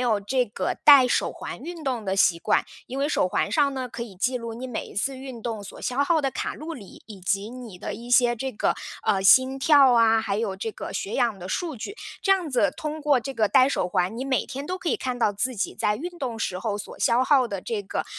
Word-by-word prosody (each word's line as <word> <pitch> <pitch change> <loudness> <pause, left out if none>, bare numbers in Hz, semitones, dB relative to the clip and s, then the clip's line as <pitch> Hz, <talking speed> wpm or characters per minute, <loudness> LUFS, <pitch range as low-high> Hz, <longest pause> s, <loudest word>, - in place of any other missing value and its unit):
有 235 -4 +2
这 250 +5 0
个 210 - -3
戴 280 -4 +9
手 - - +1
环 - - -7
运 335 -2 -8
动 245 -5 -2
的 190 -1 -1
习 180 -3 +4
惯？ - - +2 0.2
因 265 +2 -5
为 285 +2 +1
手 185 - +1
环 - - 0
上 285 -3 +3
呢， 255 -1 -4
可 235 - -6
以 215 -5 -9
记 250 +7 0
录 230 -1 -6
你 250 +3 -6
每 245 -4 -5
一 - - -13
次 265 +7 -1
运 260 -2 -8
动 220 -2 -4
所 200 - -10
消 255 +3 0
耗 315 +2 +2
的 275 - 0
卡 - - -3
路 320 +2 -7
里， 205 -8 -12
以 205 -4 -11
及 195 +3 -1
你 240 -6 -10
的 - - -5
一 240 +1 -10
些 245 -1 +5
这 265 +3 -4
个 - - 0 0.3
呃， 190 -1 +2
心 260 +7 +6
跳 280 -2 +6
啊， 225 -1 +4
还 200 -2 -2
有 205 -4 -2
这 220 +2 -4
个 - - -7
血 200 - -4
氧 235 -6 +1
的 185 +1 -8
数 325 - -3
据。 400 - -6 0.3
这 390 - +4
样 360 -5 -1
子 265 +3 +2
通 310 0 -4
过 290 -4 +3
这 270 +3 -5
个 220 -4 +2
戴 260 +1 +5
手 275 - -1
环， 185 +3 0
你 260 - -3
每 265 -2 0
天 275 +2 -7
都 365 - -3
可 365 - -4
以 - - +1
看 255 -1 -3
到 220 -4 +1
自 250 +6 -1
己 200 - -2
在 210 - +1
运 350 +5 -7
动 245 -6 -4
时 185 -4 -2
候 205 +1 -2
所 205 - -9
消 240 +2 +3
耗 265 -4 +4
的 200 -4 -5
这 215 -1 -3
个， 190 - -3
245 Hz, 285 characters per minute, -25 LUFS, 210-275 Hz, 0.3 s, 戴